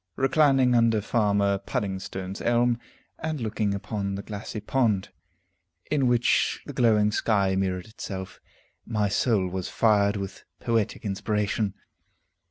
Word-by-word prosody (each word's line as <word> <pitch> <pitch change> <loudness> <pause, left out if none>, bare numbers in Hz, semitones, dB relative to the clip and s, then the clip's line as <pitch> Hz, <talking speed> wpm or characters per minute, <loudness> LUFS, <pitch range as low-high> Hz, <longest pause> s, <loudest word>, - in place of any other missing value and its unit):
Reclining 135 -2 +3
under 115 -2 +4
Farmer 100 -2 +1
Puddingstone's 95 -4 -4
elm, 120 0 +2 0.4
and 160 -2 -3
looking 110 -3 -1
upon 100 0 -3
the 100 - -5
glassy 105 +1 -6
pond, 105 -4 0 0.8
in 140 -4 +2
which 120 -1 +2
the - - -7
glowing 105 -3 +3
sky 100 -3 +1
mirrored 95 -1 -1
itself, 95 -4 -7 0.4
my 105 -3 0
soul 100 -2 +1
was 90 0 -4
fired 105 -2 +3
with 100 -1 -6 0.2
poetic 115 -2 -1
inspiration. 105 0 -1
105 Hz, 120 wpm, -26 LUFS, 100-115 Hz, 0.8 s, under